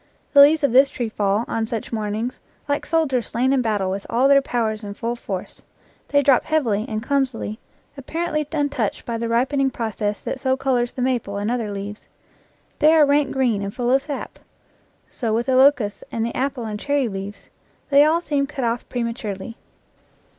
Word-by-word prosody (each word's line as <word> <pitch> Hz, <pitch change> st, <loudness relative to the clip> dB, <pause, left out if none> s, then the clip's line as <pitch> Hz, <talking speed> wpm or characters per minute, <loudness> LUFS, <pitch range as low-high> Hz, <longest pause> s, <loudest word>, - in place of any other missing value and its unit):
The 285 Hz, -, +9 dB
leaves 295 Hz, +2 st, +6 dB
of 280 Hz, -, +3 dB
this 265 Hz, +3 st, +6 dB
tree 240 Hz, -4 st, -3 dB
fall, 205 Hz, +1 st, 0 dB
on 225 Hz, -1 st, -2 dB
such 225 Hz, 0 st, -5 dB
mornings, 220 Hz, +3 st, -3 dB, 0.3 s
like 285 Hz, 0 st, -1 dB
soldiers 300 Hz, -7 st, +1 dB
slam 260 Hz, +3 st, +1 dB
in 265 Hz, -, +2 dB
battle 205 Hz, -5 st, 0 dB
with 195 Hz, +1 st, -5 dB
all 250 Hz, +4 st, +3 dB
their 275 Hz, 0 st, +6 dB
powers 225 Hz, -4 st, -2 dB
in 200 Hz, -1 st, -6 dB
full 235 Hz, +2 st, -3 dB
force. 195 Hz, -6 st, -6 dB, 0.5 s
They 285 Hz, 0 st, +3 dB
drop 265 Hz, -3 st, +4 dB
heavily 240 Hz, -9 st, 0 dB
and 215 Hz, 0 st, -3 dB
clumsily, 255 Hz, -5 st, -1 dB, 0.4 s
apparently 305 Hz, +2 st, -3 dB
untouched 285 Hz, -8 st, -1 dB
by 230 Hz, -1 st, -3 dB
the 230 Hz, 0 st, -2 dB
ripening 265 Hz, +4 st, +2 dB
process 215 Hz, -4 st, -3 dB
that 265 Hz, -, -4 dB
so 260 Hz, 0 st, +1 dB
colors 250 Hz, -3 st, 0 dB
the 250 Hz, -, -3 dB
maple 240 Hz, -6 st, -1 dB
and 205 Hz, +3 st, -1 dB
other 235 Hz, -4 st, -2 dB
leaves. 205 Hz, +1 st, -7 dB, 0.7 s
They 305 Hz, 0 st, +6 dB
are 310 Hz, -2 st, +6 dB
rank 285 Hz, 0 st, +2 dB
green 245 Hz, -6 st, +1 dB
and 200 Hz, 0 st, -3 dB
full 245 Hz, +2 st, -1 dB
of 270 Hz, +1 st, +4 dB
sap. 285 Hz, 0 st, -6 dB, 0.7 s
So 225 Hz, -3 st, -2 dB
with 235 Hz, +1 st, 0 dB
the 260 Hz, -1 st, +1 dB
locusts, 255 Hz, -7 st, +3 dB
and 225 Hz, -1 st, -1 dB
the 235 Hz, -, -4 dB
apple 260 Hz, -2 st, -2 dB
and 210 Hz, -1 st, -4 dB
cherry 285 Hz, -1 st, 0 dB
leaves; 200 Hz, 0 st, -7 dB, 0.4 s
they 280 Hz, +1 st, +7 dB
all 320 Hz, +3 st, +3 dB
seem 285 Hz, -4 st, -1 dB
cut 275 Hz, -4 st, -3 dB
off 235 Hz, +1 st, -2 dB
prematurely. 230 Hz, -3 st, -4 dB
245 Hz, 190 wpm, -22 LUFS, 215-275 Hz, 0.7 s, The